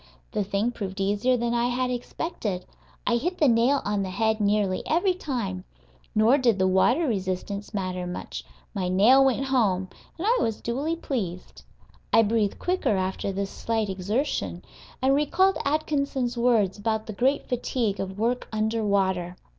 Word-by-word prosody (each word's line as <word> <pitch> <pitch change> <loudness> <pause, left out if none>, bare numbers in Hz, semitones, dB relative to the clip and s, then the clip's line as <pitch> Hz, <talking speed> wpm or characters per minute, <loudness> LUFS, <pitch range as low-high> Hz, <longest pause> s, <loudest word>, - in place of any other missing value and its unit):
The 210 - 0
thing 200 +4 0
proved 200 -4 -6
easier 205 +6 +2
than 235 0 -1
I 240 0 +2
had 250 +1 0
expected. 235 - -4 0.4
I 235 - +2
hit 355 +9 -2
the 300 - +4
nail 245 +4 +3
on 205 -1 0
the 190 - -2
head 220 +3 0
nearly 205 -2 +1
every 355 +4 +2
time. 235 - -4 0.5
Nor 225 +6 +5
did 235 -6 +3
the 190 -1 +2
water 240 - +3
resistance 200 -1 -3
matter 185 -3 -3
much; 180 - -6 0.3
my 190 -4 -2
nail 225 +9 +6
went 270 0 +2
home, 200 -8 +1 0.3
and 340 - -4
I 475 +3 +3
was 225 -2 -1
duly 280 +8 -2
pleased. 205 - -5 0.5
I 225 - +6
breathed 215 -2 +1
quicker, 360 - 0
after 190 +1 -2
this 195 0 -3
slight 225 -2 -1
exertion, 210 +10 -2 0.4
and 265 +1 +4
recalled 355 +7 +2
Atkinson's 280 -4 0
words 225 -5 +2
about 220 +1 -1
the 215 - -6
great 265 +7 +1
fatigue 240 -4 -1
of 190 0 -4
work 235 +3 0
under 220 +1 0
water. 190 -3 0
225 Hz, 160 wpm, -26 LUFS, 195-255 Hz, 0.5 s, nail